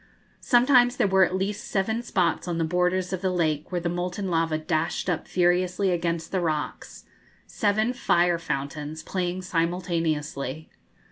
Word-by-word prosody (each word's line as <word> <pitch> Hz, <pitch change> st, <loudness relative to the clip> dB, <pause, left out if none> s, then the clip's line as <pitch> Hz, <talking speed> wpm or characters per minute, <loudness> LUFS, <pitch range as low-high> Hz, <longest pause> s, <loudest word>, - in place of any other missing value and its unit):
Sometimes 245 Hz, 0 st, +4 dB
there -, -, +3 dB
were 190 Hz, -1 st, +4 dB
at 185 Hz, -, +1 dB
least 195 Hz, +2 st, -2 dB
seven 220 Hz, +4 st, 0 dB
spots 180 Hz, -7 st, 0 dB
on 175 Hz, -1 st, -2 dB
the 165 Hz, -, +1 dB
borders 180 Hz, +2 st, 0 dB
of 185 Hz, -, -3 dB
the 190 Hz, -, +1 dB
lake 160 Hz, -4 st, -1 dB
where 175 Hz, -1 st, -1 dB
the 170 Hz, -, -2 dB
molten 180 Hz, +2 st, -3 dB
lava 165 Hz, -1 st, +1 dB
dashed 155 Hz, +1 st, -1 dB
up 165 Hz, -, -3 dB
furiously 180 Hz, +2 st, +2 dB
against 170 Hz, -1 st, -2 dB
the 185 Hz, -, 0 dB
rocks 155 Hz, -3 st, -3 dB, 0.4 s
seven 215 Hz, +3 st, 0 dB
fire 175 Hz, -7 st, +2 dB
fountains 150 Hz, 0 st, -4 dB
playing 185 Hz, 0 st, -3 dB
simultaneously. 165 Hz, -5 st, -2 dB
175 Hz, 150 wpm, -25 LUFS, 165-190 Hz, 0.4 s, Sometimes